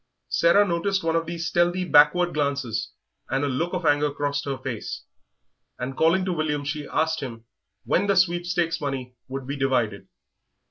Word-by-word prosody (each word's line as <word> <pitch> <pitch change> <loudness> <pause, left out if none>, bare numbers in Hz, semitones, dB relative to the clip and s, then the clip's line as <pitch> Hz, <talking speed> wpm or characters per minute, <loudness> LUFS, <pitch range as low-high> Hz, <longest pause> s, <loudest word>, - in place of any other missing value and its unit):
Sarah 185 +5 +4
noticed 190 +2 0
one 165 0 +1
of 165 -1 0
these 170 0 -4
stealthy 175 +2 +1
backward 175 +3 +5
glances 140 -6 -1 0.4
and 135 +2 0
a - - +1
look 140 +6 -1
of 180 -2 -2
anger 145 0 +3
crossed 145 0 -2
her 140 -1 -2
face, - - -5 0.7
and 130 +2 -4
calling 170 +5 +3
to 185 - 0
William 150 -3 -1
she 145 0 -4
asked 160 +1 0
him 115 -5 -7 0.4
when 200 - +1
the 200 - +3
sweepstakes 175 -2 +1
money 135 -3 -4
would 135 0 -5
be 140 +2 -4
divided. 125 -7 0
150 Hz, 170 wpm, -25 LUFS, 140-175 Hz, 0.7 s, backward